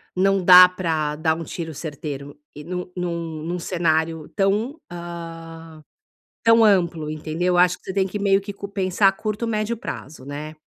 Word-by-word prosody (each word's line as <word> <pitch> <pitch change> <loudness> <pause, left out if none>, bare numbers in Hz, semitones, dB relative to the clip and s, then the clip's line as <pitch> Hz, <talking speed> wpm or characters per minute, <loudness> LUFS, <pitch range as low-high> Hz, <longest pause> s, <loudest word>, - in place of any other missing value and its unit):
não 195 +1 +2
dá 180 0 +10
pra 160 -5 -2
dar 160 +1 +1
um 165 - -6
tiro 165 -1 -6
certeiro 145 -2 -7 0.2
e 150 - -9
num 180 +2 -5
num 170 -3 -4
num 175 +2 -3
cenário 160 -2 -1
tão 215 +9 0
hã, 165 -2 -9 0.6
tão 230 0 +6
amplo, 170 -6 +2
entendeu. 160 +4 -2
Eu - - +2
acho 180 0 +4
que - - -30
você 190 - -5
tem 195 0 +2
que 205 +2 -5
meio 200 -1 +3
que 200 0 -7 0.2
pensar 190 0 +2
a - - +6
curto 215 +3 -3
médio 215 +1 -1
prazo, 150 - -8
né. 150 +2 -6
175 Hz, 175 wpm, -22 LUFS, 160-195 Hz, 0.6 s, dá